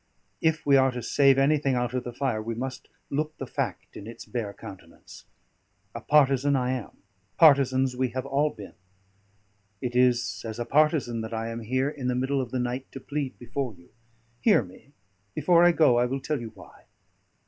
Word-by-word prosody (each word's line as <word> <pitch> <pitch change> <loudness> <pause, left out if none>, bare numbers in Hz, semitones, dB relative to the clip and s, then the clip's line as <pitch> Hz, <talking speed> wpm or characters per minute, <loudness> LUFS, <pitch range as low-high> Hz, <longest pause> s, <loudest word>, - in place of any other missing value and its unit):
"If 160 -1 +1
we 140 -1 +5
are 135 0 +4
to 125 -1 -5
save 135 +3 +4
anything 140 -1 +2
out 120 0 -1
of 125 - -2
the 120 - -6
fire, 120 -3 -2
we 115 +1 -4
must 130 +2 -6 0.2
look 155 +2 -2
the 135 - -5
fact - - -4
in 100 - -9
its 115 - -10
bare 115 -5 -4
countenance. 100 -2 -13 0.7
A - - -7
partisan 140 -1 +3
I 125 -1 0
am; 125 -5 -6 0.3
partisans 135 -4 +4
we 130 0 0
have 130 +2 -4
all 140 +2 +1
been; 105 -8 -11 1.1
it 125 +1 -4
is 125 -1 +2
as 110 -1 -6
a 120 - -3
partisan 145 -6 +2
that 110 +1 -5
I 115 +1 -3
am 115 0 -5
here 130 +5 -1
in 140 -4 -5
the 125 - 0
middle 135 +2 0
of 125 - -5
the 130 - -3
night 125 +1 -3
to 135 - -7
plead 145 0 -4
before 125 -1 -4
you. 85 0 -21 0.5
Hear 115 - +4
me; 95 +9 -16 0.4
before 175 -1 +4
I 175 - +7
go, 155 -8 +4
I 120 - +2
will 135 +2 -3
tell 140 0 -3
you 115 - -6
why." - - -16
130 Hz, 195 wpm, -26 LUFS, 120-140 Hz, 1.1 s, I